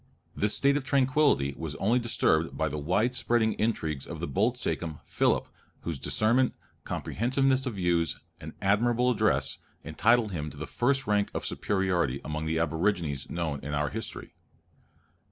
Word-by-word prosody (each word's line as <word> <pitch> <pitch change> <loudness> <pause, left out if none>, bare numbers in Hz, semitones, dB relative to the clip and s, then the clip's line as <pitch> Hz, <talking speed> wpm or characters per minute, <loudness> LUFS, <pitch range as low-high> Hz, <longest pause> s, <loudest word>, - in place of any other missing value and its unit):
This 105 +1 +1
state 140 +1 +3
of 145 - -3
tranquillity 135 - +2
was 80 -3 -5
only 115 +10 +2
disturbed 85 -8 +1
by 80 0 0
the 75 +1 -4
wide 100 - +1
spreading 115 -3 +2
intrigues 80 -11 -1
of - - -7
the - - -2
bold 115 +6 +1
sachem, 80 -9 -3
Philip, - - +1 0.3
whose 80 -5 -4
discernment, 120 - +2 0.3
comprehensiveness 130 +3 0
of 120 - -3
views, 85 -4 0 0.2
and - - -8
admirable 120 +5 +3
address, 120 - +1 0.2
entitle 110 +9 +2
him 75 -5 -4
to 70 - -13
the 80 - -5
first 135 - +1
rank 105 -2 +1
of - - -3
superiority 90 -9 0
among 75 +2 -3
the 80 +1 0
aborigines 80 -4 0
known 80 -4 -2
in 75 +1 -4
our 75 -1 0
history. - - -6
100 Hz, 155 wpm, -28 LUFS, 80-120 Hz, 0.3 s, state